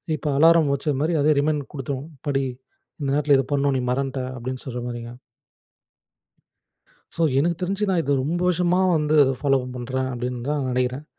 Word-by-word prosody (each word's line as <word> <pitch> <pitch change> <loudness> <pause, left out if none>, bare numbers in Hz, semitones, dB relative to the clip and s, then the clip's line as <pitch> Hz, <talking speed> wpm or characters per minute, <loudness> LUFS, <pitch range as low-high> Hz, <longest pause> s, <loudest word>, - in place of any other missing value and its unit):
இப்போ 150 - -3
அலாரம் 165 -1 +5
வச்சது 140 0 -1
மாரி, 160 +3 +1
அதே 155 +2 +4
ரிமைண்ட் 145 -1 -1
கொடுத்துடும். 140 +2 -5 0.2
படி 135 -1 +1 0.6
இந்த 140 -2 -2
நேரத்தில 145 -1 +4
இத 135 - 0
பண்ணணும். 140 -1 +1
நீ - - -1
மறந்துட்ட 135 0 -2
அப்படின்னு 130 +2 -5
சொல்ற 125 -2 -5
மாரிங்க. 120 -1 -6 2.1
ஸோ 165 - 0 0.2
எனக்கு 170 +3 +1
தெரிஞ்சு 195 +3 -1
நான் 180 - +2
இதை 140 +1 +1
ரொம்ப 170 +6 -1
வருஷமா 180 +1 +2 0.2
வந்து 150 0 +1
அதை 135 - +1
ஃபாலோ 135 -2 +3 0.2
பண்ணுறேன் 130 +1 -3
அப்படின்னு 125 0 -4
தான் 145 -2 -1
நினைக்கிறேன். 125 +3 -1
140 Hz, 165 wpm, -23 LUFS, 130-155 Hz, 2.1 s, அலாரம்